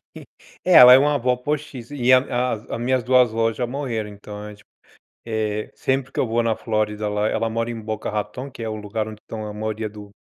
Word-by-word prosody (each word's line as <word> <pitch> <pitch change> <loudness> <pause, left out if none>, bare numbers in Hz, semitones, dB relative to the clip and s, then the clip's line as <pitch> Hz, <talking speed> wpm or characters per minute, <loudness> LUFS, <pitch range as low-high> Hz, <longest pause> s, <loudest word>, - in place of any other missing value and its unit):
tem - - -11 0.4
eh, 185 - +2
ela 125 -4 +11
é - - +8
uma 145 +2 +2
avó 125 -2 +1
postiça, 145 -1 -5
e 130 -1 +3
a 130 - +9
a 125 -1 -1
as 110 +1 -5
minhas 130 +1 +1
2 125 -1 +4
avós 115 0 0
já 125 - -1
morreram, 120 -5 -3
então 105 0 -10
a 105 - -8
gente, 105 0 -15 0.6
eh, 110 -2 -2
sempre 135 0 -1
que - - -7
eu - - +1
vou 115 +1 +1
na 115 -1 0
Flórida, 105 -1 -1
lá 105 +1 0
ela 115 - -1
mora 115 +1 -2
em 115 - -5
Boca 110 0 -4
Raton, 125 +6 -4
que 120 - -10
é 110 - -3
o 110 - -4
lugar 105 +1 -4
onde 110 0 -10
estão 110 -1 -7
a 105 - -6
maioria 110 +1 -3
do 105 -1 -12
115 Hz, 240 wpm, -22 LUFS, 105-125 Hz, 0.6 s, ela